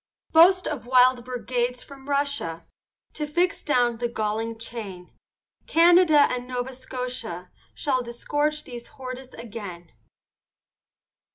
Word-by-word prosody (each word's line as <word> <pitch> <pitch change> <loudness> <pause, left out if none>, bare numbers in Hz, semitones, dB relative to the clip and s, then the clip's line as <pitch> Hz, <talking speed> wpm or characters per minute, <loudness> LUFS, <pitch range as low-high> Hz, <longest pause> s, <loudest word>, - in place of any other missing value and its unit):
Boast 365 +3 +6
of 245 -6 -4
wild 255 -1 +5
brigades 245 0 -2
from 275 0 -13
Russia, 280 - -1 0.5
To 300 - -4
fix 345 +4 +1
down 245 -5 +1
the 240 +1 -1
galling 225 0 -2
chain, 210 -6 -7 0.5
Canada 335 -2 +6
and 250 -3 +1
Nova 250 +1 -3
Scotia, 250 -8 -5 0.2
Shall 260 -3 0
disgorge 290 +5 -2
these 240 -4 -9
hordes 255 0 -9
again. 200 -7 -8
250 Hz, 110 wpm, -25 LUFS, 230-285 Hz, 0.5 s, Boast